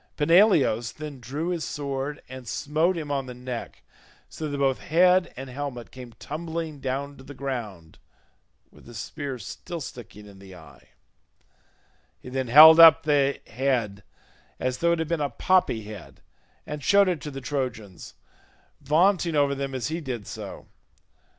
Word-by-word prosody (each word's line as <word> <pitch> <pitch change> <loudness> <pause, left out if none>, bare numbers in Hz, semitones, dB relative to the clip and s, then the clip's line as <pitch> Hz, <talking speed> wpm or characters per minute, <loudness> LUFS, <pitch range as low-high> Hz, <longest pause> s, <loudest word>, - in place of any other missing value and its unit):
Peneleos 150 - +3
then 150 -3 -8
drew 140 +8 -4
his 170 -3 -2
sword 140 0 -4
and 130 -1 -10
smote 160 +9 0
him 150 -3 -5
on 135 -2 -2
the 125 - -8
neck, 125 -1 -7 0.4
so 155 -1 -6
that 145 - -4
both 135 -2 +1
head 180 +2 +3
and 135 +1 -7
helmet 130 -2 -6
came 125 -2 -11
tumbling 160 +1 -6
down 140 +2 -4
to 130 - -13
the 145 +1 -11
ground 110 -13 -6 0.7
with - - -19
the 120 - -12
spear 140 +3 -5
still 120 - -7
sticking 120 -6 -10
in 100 -2 -15
the 95 -1 -13
eye; 80 -5 -17 1.3
he - - -11
then 130 0 -3
held 155 +6 +9
up 165 -1 +9
the 140 -2 +2
head, 115 -5 -1 0.6
as 130 0 -2
though 170 0 +2
it - - 0
had 160 -1 -2
been 165 -1 -1
a 145 - 0
poppy 155 -5 +1
head, 105 0 -11 0.5
and 150 -1 -7
showed 200 -1 +5
it 175 -4 -1
to 150 - -6
the 135 -1 -7
Trojans, 125 -9 -5 0.7
vaunting 170 +3 +2
over 140 -1 +2
them 135 -1 -4
as 130 +3 -3
he 165 +2 -3
did 125 -8 -5
so. - - -8
140 Hz, 165 wpm, -25 LUFS, 125-160 Hz, 1.3 s, held